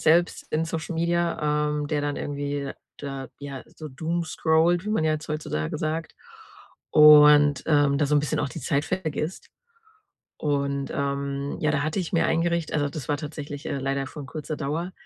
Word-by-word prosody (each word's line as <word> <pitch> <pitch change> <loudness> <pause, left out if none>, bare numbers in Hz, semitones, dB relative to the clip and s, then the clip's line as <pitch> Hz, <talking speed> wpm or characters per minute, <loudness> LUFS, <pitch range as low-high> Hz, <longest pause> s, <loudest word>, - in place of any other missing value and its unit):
selbst 170 +3 +3
in 155 +1 +1
Social 165 +1 -4
Media, 165 -3 +1
ähm, 150 0 -2
der 150 0 -1
dann 145 0 -2
irgendwie 145 -1 -3 0.2
da, 135 -3 -6
ja, 140 -2 -7
so 155 - -7
doomscrollt, 165 +3 +1
wie - - -4
man 185 -7 +1
ja 155 - +3
jetzt 155 0 -4
heutzutage 80 - -3
sagt, 160 +1 -3 0.8
und, 150 -2 +7
ähm, 145 -2 +3
da 145 - +2
so 150 - +1
'n - - +4
bisschen 145 - -1
auch 145 - -1
die 165 - -7
Zeit 145 -1 0
vergisst. 165 -2 -3 0.9
Und, 140 -2 -1
ähm, 140 0 -2
ja, 155 - +1
da 140 -1 0
hatte 155 +5 -1
ich 175 - -4
mir 170 - +3
eingericht 170 0 0
also, 145 -1 +1
das 140 -2 -7
war 145 - +1
tatsächlich, 145 -1 -7
äh, - - -2
leider 135 0 -2
von 145 +1 -8
kurzer 155 +2 -5
Dauer. 160 +5 -3
150 Hz, 180 wpm, -25 LUFS, 140-160 Hz, 0.9 s, und